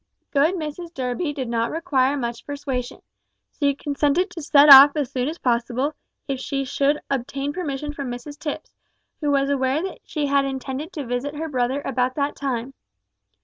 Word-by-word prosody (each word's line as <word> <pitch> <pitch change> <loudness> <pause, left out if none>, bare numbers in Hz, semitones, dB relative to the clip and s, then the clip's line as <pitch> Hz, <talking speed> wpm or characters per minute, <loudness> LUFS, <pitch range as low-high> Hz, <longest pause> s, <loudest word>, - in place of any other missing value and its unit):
Good 310 +5 +3
Mrs 330 +1 -5
Durby 260 +5 -2
did 270 -4 -4
not 230 0 0
require 285 -5 +1
much 235 -3 -4
persuasion. 270 -3 -4 0.6
She 280 -2 +2
consented 295 +6 0
to 340 - -7
set 290 -1 +5
off 280 0 +11
as 290 -5 -2
soon 255 0 -1
as 320 +3 -4
possible, 250 +3 0 0.3
if 270 -2 -2
she 275 0 -2
should 280 +2 +1
obtain 275 +2 -2
permission 295 -4 -4
from 280 -3 -5
Mrs 265 +5 -7
Tipps, 300 -2 -5 0.5
who 295 - -1
was 275 0 +2
aware 270 +3 +1
that 380 - -5
she 300 -3 -3
had 280 0 +3
intended 270 +4 -4
to 295 -4 -5
visit 245 +5 -3
her 320 +2 -3
brother 260 +1 -1
about 255 -1 0
that 285 0 -1
time. 265 -2 -3
280 Hz, 175 wpm, -23 LUFS, 260-295 Hz, 0.6 s, off